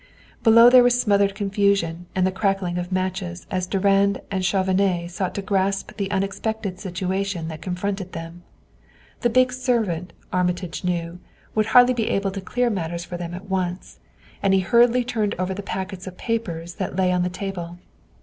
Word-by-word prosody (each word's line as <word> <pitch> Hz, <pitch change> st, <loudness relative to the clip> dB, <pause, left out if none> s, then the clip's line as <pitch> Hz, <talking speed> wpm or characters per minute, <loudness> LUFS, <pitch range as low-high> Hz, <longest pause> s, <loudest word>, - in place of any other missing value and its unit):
Below 230 Hz, +1 st, +7 dB
there 255 Hz, 0 st, +9 dB
was 245 Hz, 0 st, +4 dB
smothered 200 Hz, -3 st, +2 dB
confusion 195 Hz, -4 st, 0 dB
and 185 Hz, -1 st, +2 dB
the 185 Hz, -, +1 dB
crackling 190 Hz, -2 st, 0 dB
of 175 Hz, +1 st, -5 dB
matches 185 Hz, -1 st, -3 dB
as 185 Hz, -1 st, -1 dB
Durand 195 Hz, +1 st, +2 dB
and 190 Hz, -1 st, -1 dB
Chauvenet 185 Hz, -2 st, +1 dB
sought 180 Hz, +1 st, -3 dB
to 200 Hz, -, -3 dB
grasp 195 Hz, 0 st, 0 dB
the 200 Hz, -2 st, -2 dB
unexpected 195 Hz, 0 st, -2 dB
situation 190 Hz, -2 st, -2 dB
that 155 Hz, -1 st, -8 dB
confronted 190 Hz, +1 st, -3 dB
them. 165 Hz, +1 st, -7 dB, 0.8 s
The 240 Hz, -, +2 dB
big 255 Hz, +1 st, +3 dB
servant, 220 Hz, -10 st, -1 dB, 0.2 s
Armitage 180 Hz, -1 st, -1 dB
knew, 175 Hz, -1 st, -2 dB, 0.3 s
would 215 Hz, 0 st, +1 dB
hardly 250 Hz, +2 st, +6 dB
be 230 Hz, -3 st, -1 dB
able 195 Hz, 0 st, 0 dB
to 195 Hz, 0 st, -5 dB
clear 245 Hz, +5 st, 0 dB
matters 170 Hz, -3 st, -3 dB
for 175 Hz, -, -7 dB
them 175 Hz, 0 st, -5 dB
at 190 Hz, +3 st, -9 dB
once, 185 Hz, -1 st, -3 dB, 0.4 s
and 195 Hz, -1 st, +3 dB
he 190 Hz, -, +3 dB
hurriedly 240 Hz, +6 st, +4 dB
turned 225 Hz, -4 st, -1 dB
over 185 Hz, +1 st, -1 dB
the 200 Hz, -, -5 dB
packets 190 Hz, -1 st, -5 dB
of 180 Hz, -1 st, -8 dB
papers 175 Hz, -8 st, -3 dB
that -, -, -3 dB
lay 185 Hz, -1 st, +2 dB
on 180 Hz, 0 st, +1 dB
the 180 Hz, -, 0 dB
table. 180 Hz, -2 st, -5 dB
190 Hz, 175 wpm, -23 LUFS, 180-205 Hz, 0.8 s, there